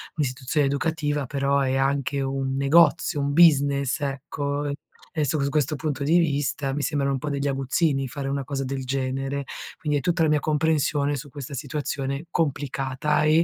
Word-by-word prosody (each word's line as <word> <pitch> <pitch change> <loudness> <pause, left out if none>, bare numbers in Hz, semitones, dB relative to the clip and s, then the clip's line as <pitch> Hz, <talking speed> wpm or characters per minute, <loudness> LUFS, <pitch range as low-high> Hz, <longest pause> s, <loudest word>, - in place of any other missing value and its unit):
un'istituzione 140 0 0
educativa, 150 -1 -1
però 140 +1 +1
è 130 -1 +1
anche 140 +1 0
un 135 0 -2
negozio, 150 +2 +4
un 140 0 0
business, 140 -5 +4
ecco 140 +1 -2 0.4
e 155 -3 0
su 150 +2 0
questo 150 0 0
punto 145 -1 -3
di 165 +5 +4
vista 145 -3 0
mi 145 0 -2
sembrano 140 -2 0
un - - 0
po' 150 - -4
degli 140 0 -1
aguzzini 135 +1 0
fare 135 +1 -5
una 140 0 -1
cosa 135 +1 -3
del 135 0 -3
genere, 135 +1 -2 0.4
quindi 150 -4 0
hai 140 - -4
tutta 175 -1 +1
la 160 - +4
mia 150 -1 +3
comprensione 150 -1 +1
su 140 +2 -7
questa 140 -1 -7
situazione 140 +1 -3
complicata 140 -2 0
e, 155 +2 +5
140 Hz, 170 wpm, -25 LUFS, 135-150 Hz, 0.4 s, e